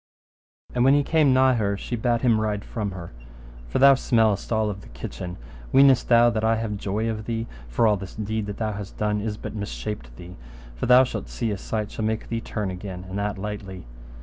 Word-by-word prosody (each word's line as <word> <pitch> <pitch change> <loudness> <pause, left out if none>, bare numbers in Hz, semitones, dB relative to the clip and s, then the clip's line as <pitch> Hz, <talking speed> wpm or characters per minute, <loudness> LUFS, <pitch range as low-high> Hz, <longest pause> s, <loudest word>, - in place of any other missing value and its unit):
And 125 - +2
when 135 +2 +6
he 145 - +3
came 155 -2 +3
nigh 130 0 +5
her 100 -4 0
she 120 - -4
bade 120 0 0
him 115 -4 +3
ride 105 -2 -2
from 105 -3 -3
her, 90 -3 -8 0.6
For - - -2
thou 140 +1 +8
smellest 110 -6 +1
all 110 -1 +2
of 100 -1 -8
the - - -14
kitchen: 75 +9 -7 0.3
weenest 135 -2 +5
thou 120 0 +6
that 110 -1 -2
I 110 0 +3
have 110 -2 -2
joy 105 +2 -2
of 110 -1 -3
thee, 115 0 -2 0.2
for - - +1
all 105 -2 +4
this 95 0 -9
deed 110 0 -3
that 100 - -5
thou 110 -1 -1
hast 100 -1 -7
done 105 -1 0
is 105 0 -3
but - - -7
mishapped 100 - -5
thee: 90 +7 -11 0.4
but - - -2
thou 125 +1 +8
shalt 130 - -5
see 115 -3 -2
a 100 - -2
sight 105 0 -3
shall 110 - -4
make 110 0 -2
thee 115 -1 -2
turn 105 -4 -3
again, 95 0 -7
and 95 +2 -4
that 105 0 -2
lightly. 95 -2 -6
110 Hz, 225 wpm, -24 LUFS, 100-115 Hz, 0.6 s, thou